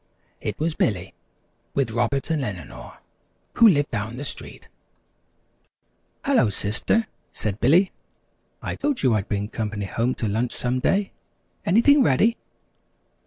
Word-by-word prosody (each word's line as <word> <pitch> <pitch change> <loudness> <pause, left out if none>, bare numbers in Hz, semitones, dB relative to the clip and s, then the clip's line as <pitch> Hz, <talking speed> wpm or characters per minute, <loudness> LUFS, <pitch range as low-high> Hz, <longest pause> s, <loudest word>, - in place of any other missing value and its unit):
It - - -3
was 160 +1 0
Billy 95 - -1 0.6
with 135 -5 +1
Robert 120 +6 0
and 155 -3 0
Eleanor 95 - -7 0.6
who 230 - +8
lived 145 -7 +3
down 110 +4 -3
the 140 - -5
street. - - -8 1.6
"Hello, 270 - +3
Sister," 105 - +1 0.3
said 105 -1 -3
Billy, 175 +9 +4 0.7
"I - - -3
told 285 - -1
you 130 -3 +4
I'd 105 -2 -1
bring 100 0 -1
company 105 -2 -4
home 115 +6 -1
to 110 - -2
lunch 115 +4 -1
some 125 +1 0
day. 195 +8 +1 0.6
Anything 255 - +5
ready?" 220 - +3
125 Hz, 130 wpm, -24 LUFS, 105-180 Hz, 1.6 s, who